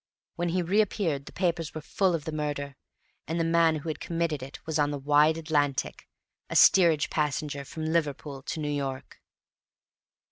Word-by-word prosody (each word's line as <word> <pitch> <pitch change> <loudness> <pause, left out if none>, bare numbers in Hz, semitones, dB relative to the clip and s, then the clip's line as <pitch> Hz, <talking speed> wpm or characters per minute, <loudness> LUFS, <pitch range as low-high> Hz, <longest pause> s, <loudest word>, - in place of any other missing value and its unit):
When 175 0 -1
he 180 +1 0
reappeared 180 -6 0
the - - -8
papers 170 -4 -1
were 155 - -4
full 185 +3 +1
of 155 - -5
the 160 - -3
murder; 145 -2 -3 0.5
and 165 +2 -2
the - - +2
man 165 -1 +3
who 155 +1 -6
had 155 - -3
committed 165 -4 -2
it 135 +2 -8
was 160 -1 -1
on 145 0 +3
the 145 - -3
wide 150 +3 +3
Atlantic, 145 -4 -1 0.4
a - - -4
steerage 170 -5 +5
passenger 150 -1 -1
from 155 +3 -6
Liverpool 150 -3 -2
to 150 - -5
New 150 -1 -2
York. 135 -2 -4
155 Hz, 175 wpm, -28 LUFS, 145-165 Hz, 0.5 s, steerage